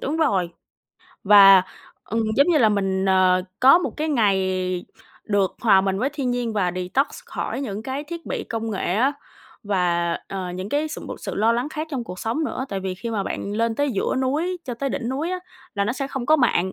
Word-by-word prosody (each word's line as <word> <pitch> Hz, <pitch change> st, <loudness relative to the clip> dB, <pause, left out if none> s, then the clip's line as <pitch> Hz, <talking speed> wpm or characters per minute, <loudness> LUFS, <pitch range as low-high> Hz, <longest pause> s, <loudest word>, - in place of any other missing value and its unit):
đúng 295 Hz, +4 st, -2 dB
rồi. 195 Hz, -, +1 dB, 0.7 s
Và, 195 Hz, -2 st, +8 dB, 0.4 s
ừm, 225 Hz, +2 st, -1 dB
giống 280 Hz, -, +5 dB
như 335 Hz, -3 st, +4 dB
là 225 Hz, -5 st, +5 dB
mình, 195 Hz, -2 st, 0 dB
ờ, 185 Hz, -1 st, +3 dB, 0.2 s
có 270 Hz, +7 st, +8 dB
một 360 Hz, -, -2 dB
cái 310 Hz, +1 st, -2 dB
ngày 190 Hz, -, +1 dB, 0.4 s
được 200 Hz, -3 st, 0 dB
hòa 210 Hz, -5 st, +5 dB
mình 195 Hz, 0 st, -1 dB
với 260 Hz, +6 st, 0 dB
thiên 275 Hz, -4 st, -2 dB
nhiên 245 Hz, -2 st, -2 dB
và 185 Hz, -4 st, 0 dB
detox 185 Hz, +10 st, 0 dB, 0.2 s
khỏi 470 Hz, -, -4 dB
những 215 Hz, -6 st, -4 dB
cái 265 Hz, +5 st, -4 dB
thiết 335 Hz, +1 st, -8 dB
bị -, -, -3 dB
công 225 Hz, 0 st, -4 dB
nghệ 190 Hz, -3 st, -1 dB
á, 260 Hz, +6 st, +2 dB, 0.5 s
và, 175 Hz, -4 st, 0 dB, 0.2 s
ờ, 185 Hz, -2 st, -4 dB
những 185 Hz, +2 st, -5 dB
cái 295 Hz, +4 st, 0 dB
sự 310 Hz, -, -7 dB
b -, -, -8 dB
sự -, -, -6 dB
lo 225 Hz, +3 st, +3 dB
lắng 245 Hz, +5 st, -1 dB
khác 310 Hz, +1 st, -5 dB
trong 260 Hz, -5 st, -3 dB
cuộc 180 Hz, -4 st, -8 dB
sống 235 Hz, +8 st, -2 dB
nữa. 260 Hz, -, -3 dB
Tại 195 Hz, -1 st, -3 dB
vì 190 Hz, -1 st, -3 dB
khi 230 Hz, +5 st, -6 dB
mà 210 Hz, -3 st, -1 dB
bạn 200 Hz, +1 st, -4 dB
lên 230 Hz, 0 st, +1 dB
tới 285 Hz, +3 st, 0 dB
giữa 195 Hz, -, -1 dB
núi 300 Hz, +8 st, -1 dB
cho 250 Hz, -, -4 dB
tới 275 Hz, +4 st, -2 dB
đỉnh 250 Hz, -3 st, -3 dB
núi 285 Hz, +7 st, -2 dB
á, 370 Hz, -, -2 dB, 0.4 s
là 200 Hz, -, 0 dB
nó 230 Hz, -, 0 dB
sẽ 275 Hz, 0 st, -3 dB
không 265 Hz, -3 st, -5 dB
có 310 Hz, -, +5 dB
mạng, 190 Hz, -, +1 dB
225 Hz, 225 wpm, -23 LUFS, 190-275 Hz, 0.7 s, Và